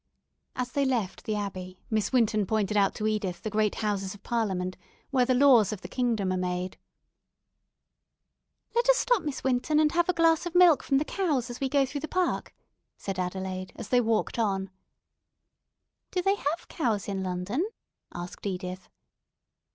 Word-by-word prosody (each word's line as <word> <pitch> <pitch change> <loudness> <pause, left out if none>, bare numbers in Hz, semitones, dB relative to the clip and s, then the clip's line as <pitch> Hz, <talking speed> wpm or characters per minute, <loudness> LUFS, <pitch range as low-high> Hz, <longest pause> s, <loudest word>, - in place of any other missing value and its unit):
As 250 -1 -3
they 280 - +1
left 240 -8 -1
the 215 - -1
Abbey, 185 -3 -5
Miss 215 -2 +1
Winton 220 -5 +2
pointed 215 -1 0
out 200 -1 +3
to 215 - -3
Edith 205 -5 -1
the 215 - -3
great 215 -1 +1
Houses 195 -2 -1
of 205 - -17
Parliament, 190 -6 -1 0.4
where 255 -3 +3
the 255 0 +2
laws 245 -6 +6
of 210 -3 -5
the - - -7
kingdom 225 -7 0
are - - -1
made. 180 0 -3 1.9
"Let 475 +1 +2
us - - +7
stop, 485 -4 +2
Miss 295 -4 -4
Winton, 265 +4 +2
and 305 -1 +4
have 345 +1 +1
a - - +4
glass 330 0 +3
of 350 - -7
milk 355 -4 +7
from 275 - +1
the 295 - +1
cows 290 -12 -1
as 240 - -8
we 270 - -1
go 275 0 +3
through 285 +2 -5
the 315 - -4
park," 365 +1 -1 0.5
said 195 -2 -4
Adelaide, 185 0 -4
as 230 - -8
they 250 -1 +4
walked 225 0 0
on. 195 -3 0 1.4
"Do 365 -1 -1
they 390 - +4
have 325 -2 -3
cows 220 - -1
in 195 -1 -2
London?" 185 - -1 0.5
asked 175 +1 -8
Edith. 185 -1 -5
220 Hz, 175 wpm, -28 LUFS, 190-280 Hz, 1.9 s, us